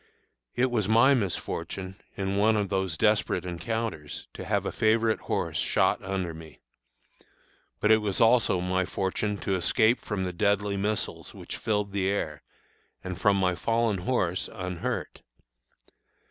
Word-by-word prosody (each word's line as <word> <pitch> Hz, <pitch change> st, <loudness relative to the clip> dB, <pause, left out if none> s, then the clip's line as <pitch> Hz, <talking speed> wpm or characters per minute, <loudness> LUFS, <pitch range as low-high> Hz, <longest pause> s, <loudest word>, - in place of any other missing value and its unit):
It 130 Hz, +1 st, +2 dB
was 110 Hz, -5 st, 0 dB
my 115 Hz, +6 st, +6 dB
misfortune, 95 Hz, -3 st, -3 dB, 0.2 s
in 95 Hz, 0 st, -1 dB
one 110 Hz, +2 st, +4 dB
of 100 Hz, -2 st, -1 dB
those 95 Hz, -5 st, -1 dB
desperate 105 Hz, -3 st, +2 dB
encounters, 90 Hz, -4 st, -4 dB
to -, -, -7 dB
have -, -, 0 dB
a -, -, -1 dB
favorite 110 Hz, 0 st, +2 dB
horse -, -, -2 dB
shot -, -, +2 dB
under 95 Hz, -3 st, -2 dB
me. 80 Hz, -2 st, -12 dB, 1.2 s
But 105 Hz, -, +3 dB
it 110 Hz, -, +8 dB
was 105 Hz, -3 st, -1 dB
also 115 Hz, -5 st, +4 dB
my 95 Hz, +1 st, +1 dB
fortune 100 Hz, +3 st, -2 dB
to 100 Hz, -, -1 dB
escape 110 Hz, +6 st, +3 dB
from 100 Hz, -3 st, -3 dB
the 90 Hz, -1 st, -3 dB
deadly 100 Hz, +2 st, +1 dB
missiles 105 Hz, +2 st, -2 dB
which -, -, -7 dB
filled 105 Hz, -2 st, -1 dB
the 95 Hz, -1 st, 0 dB
air, 75 Hz, -7 st, -2 dB, 0.6 s
and 90 Hz, -2 st, -6 dB
from 100 Hz, -2 st, +4 dB
my 90 Hz, -1 st, +2 dB
fallen 115 Hz, +2 st, 0 dB
horse, 90 Hz, -3 st, 0 dB
unhurt. 90 Hz, -4 st, -4 dB
100 Hz, 145 wpm, -27 LUFS, 90-110 Hz, 1.2 s, it